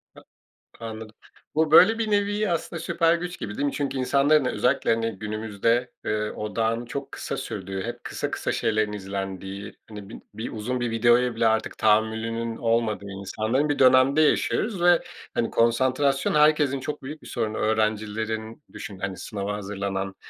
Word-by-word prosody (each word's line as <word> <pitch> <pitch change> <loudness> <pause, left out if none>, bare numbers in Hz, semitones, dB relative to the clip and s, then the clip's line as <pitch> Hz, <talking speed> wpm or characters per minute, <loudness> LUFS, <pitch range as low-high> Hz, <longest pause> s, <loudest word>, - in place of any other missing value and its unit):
Ta - - -14 0.6
Anladım. 110 -1 -7 0.4
Bu, 155 0 +2
böyle, 205 +8 +7
bir 220 -2 -1
nevi 205 0 +1
aslında 170 0 -2
süper 165 +1 +2
güç 175 +1 -4
gibi, 105 - -5
değil 145 - 0
mi? 140 - -1
Çünkü 140 -2 -2
insanların, 140 +3 +3
e - - +1
özellikle, 130 +3 +1
hani, 115 0 -1
günümüzde, 110 +3 -1
eee, 105 0 -1
odağın 115 +2 -2
çok 140 +3 -6
kısa - - -4
sürdüğü, 95 -1 -5
hep - - -6
kısa - - -3
kısa - - -2
şeylerin 110 -2 0
izlendiği, 95 0 -5
hani, 105 -3 -9
bin 110 - -10
bir 110 - -5
uzun 120 +4 -3
bir 120 -1 -1
videoya 120 +2 +3
bile 115 - +2
artık 110 0 0
tahammülünün 110 +1 +1
olmadığı 115 -3 0
insanların 110 +8 -1
bir 145 - 0
dönemde 130 +3 +5
yaşıyoruz 185 +5 +1
ve, 175 -1 +5 0.3
hani, 115 - 0
konsantrasyon 130 +4 +2
herkesin 150 -2 +4
çok 150 +2 -5
büyük 150 +4 -8
bir - - -13
sorunu. 110 -3 -2
Öğrencilerin 110 +2 -1
Düşün, 100 -2 -8
hani, 95 -1 -4
sınava 100 +1 -4
hazırlanan, 100 -1 -4
115 Hz, 165 wpm, -25 LUFS, 105-140 Hz, 0.6 s, böyle